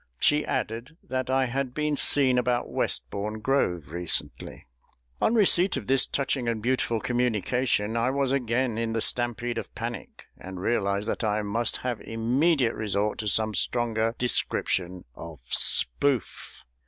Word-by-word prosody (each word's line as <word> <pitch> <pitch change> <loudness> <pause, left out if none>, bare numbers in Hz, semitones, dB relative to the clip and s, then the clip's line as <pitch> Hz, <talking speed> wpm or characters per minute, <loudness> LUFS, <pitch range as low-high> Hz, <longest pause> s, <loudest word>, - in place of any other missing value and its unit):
She 150 - +3
added, 125 +5 -3
that 130 -1 -3
I 130 0 +3
had 130 0 -3
been 150 -1 0
seen 130 -3 +4
about 125 0 0
Westbourne 105 +2 -2
Grove 100 - 0
recently. 85 0 -3 0.6
On 230 - +3
receipt 195 -3 +4
of - - -5
this 135 0 +2
touching 135 -3 -1
and 115 -1 0
beautiful 120 0 0
communication 120 -1 0
I 115 +2 +2
was 135 -1 0
again 125 -3 0
in 115 -1 -1
the 115 - 0
stampede 120 0 -2
of - - -8
panic, - - -6
and 95 0 -9
realised 100 0 0
that - - -2
I 105 0 0
must 115 +3 0
have 125 -3 -2
immediate 125 +3 +1
resort 105 -1 -1
to 110 - -3
some 110 +2 +1
stronger 115 0 0
description 95 -6 -1
of 80 +1 -10
"Spoof." 125 - +1
120 Hz, 145 wpm, -26 LUFS, 105-130 Hz, 0.6 s, seen